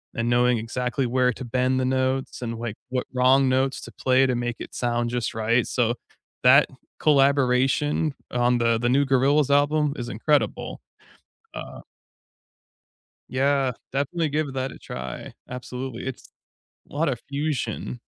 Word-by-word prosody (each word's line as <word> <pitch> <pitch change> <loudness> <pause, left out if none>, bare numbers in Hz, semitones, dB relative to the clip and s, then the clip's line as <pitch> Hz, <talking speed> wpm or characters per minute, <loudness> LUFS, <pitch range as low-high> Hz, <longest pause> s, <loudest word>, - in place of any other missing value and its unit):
and 115 +1 -1
knowing 120 0 +3
exactly 125 +3 -2
where 125 +1 +2
to 130 - -8
bend 130 +2 +1
the 130 - 0
notes 130 0 -1
and, 115 -2 -4
like, 115 -2 -4
what 125 0 -2
wrong 130 +1 +4
notes 130 +1 +1
to - - -9
play 130 +1 +3
to 125 - 0
make 120 -1 -2
it - - -8
sound 120 -1 0
just 120 -1 -2
right. 115 +2 +1
So 120 -1 +1 0.5
that 140 +4 +7 0.3
collaboration 140 +1 +2 0.2
on 120 0 +2
the 115 -1 +2
the 120 +1 +1
new 140 +3 +4
Gorillaz 135 +2 +3
album 145 +1 +3
is 120 - -4
incredible. 145 +6 0 0.8
Uh - - -8 1.5
Yeah, 135 0 +1 0.2
definitely 150 +4 -1
give 145 -2 -1
that 130 0 -2
a - - -12
try. 65 -1 -7
Absolutely. 125 0 -6
It's 130 - -7 0.6
lotta 145 -3 0
fusion. 140 - -3
130 Hz, 140 wpm, -24 LUFS, 120-140 Hz, 1.5 s, that